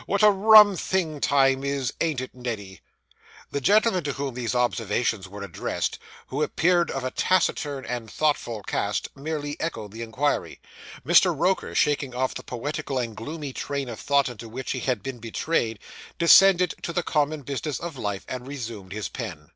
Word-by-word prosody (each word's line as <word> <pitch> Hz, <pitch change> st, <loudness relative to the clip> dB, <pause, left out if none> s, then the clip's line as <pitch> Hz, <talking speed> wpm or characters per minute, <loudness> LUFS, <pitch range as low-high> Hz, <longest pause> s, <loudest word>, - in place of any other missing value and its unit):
What 200 Hz, +1 st, +1 dB
a 210 Hz, -, +8 dB
rum 210 Hz, 0 st, +8 dB
thing 165 Hz, -6 st, -1 dB
time 135 Hz, -1 st, +3 dB
is, 140 Hz, -3 st, -1 dB
ain't 155 Hz, -6 st, 0 dB
it, 130 Hz, -, -7 dB
Neddy?' 110 Hz, -7 st, -6 dB, 0.7 s
The 140 Hz, -, -2 dB
gentleman 205 Hz, -, +3 dB
to 140 Hz, -, -1 dB
whom 140 Hz, -1 st, -4 dB
these 125 Hz, 0 st, -3 dB
observations 115 Hz, -4 st, 0 dB
were 100 Hz, +1 st, -8 dB
addressed, 95 Hz, -5 st, -3 dB, 0.3 s
who 140 Hz, +3 st, -4 dB
appeared 175 Hz, +2 st, +2 dB
of 135 Hz, -, -3 dB
a 130 Hz, -, -2 dB
taciturn 145 Hz, -6 st, 0 dB
and 120 Hz, -3 st, -4 dB
thoughtful 120 Hz, -7 st, -1 dB
cast, 100 Hz, +2 st, -2 dB
merely 145 Hz, 0 st, -4 dB
echoed 110 Hz, -11 st, -4 dB
the 110 Hz, +2 st, -8 dB
inquiry; 115 Hz, +6 st, -1 dB, 0.5 s
Mr. -, -, +5 dB
Roker, 190 Hz, +1 st, 0 dB
shaking 140 Hz, -3 st, +1 dB
off 130 Hz, +1 st, 0 dB
the -, -, -6 dB
poetical 140 Hz, +3 st, -4 dB
and 115 Hz, -3 st, -2 dB
gloomy 145 Hz, +4 st, -6 dB
train 140 Hz, -1 st, -3 dB
of 115 Hz, -, -7 dB
thought 140 Hz, -1 st, +2 dB
into 115 Hz, -2 st, -8 dB
which 130 Hz, +3 st, -5 dB
he 130 Hz, -, -2 dB
had 125 Hz, -5 st, -1 dB
been 135 Hz, -2 st, -5 dB
betrayed, 115 Hz, 0 st, -1 dB, 0.4 s
descended 180 Hz, +1 st, +6 dB
to -, -, -3 dB
the 175 Hz, -, 0 dB
common 150 Hz, -1 st, 0 dB
business 140 Hz, 0 st, -3 dB
of 170 Hz, -2 st, -6 dB
life, 105 Hz, -6 st, -4 dB
and 125 Hz, 0 st, -6 dB
resumed 115 Hz, -9 st, -7 dB
his 105 Hz, 0 st, -3 dB
pen. 85 Hz, -, -7 dB
135 Hz, 175 wpm, -25 LUFS, 115-155 Hz, 0.7 s, a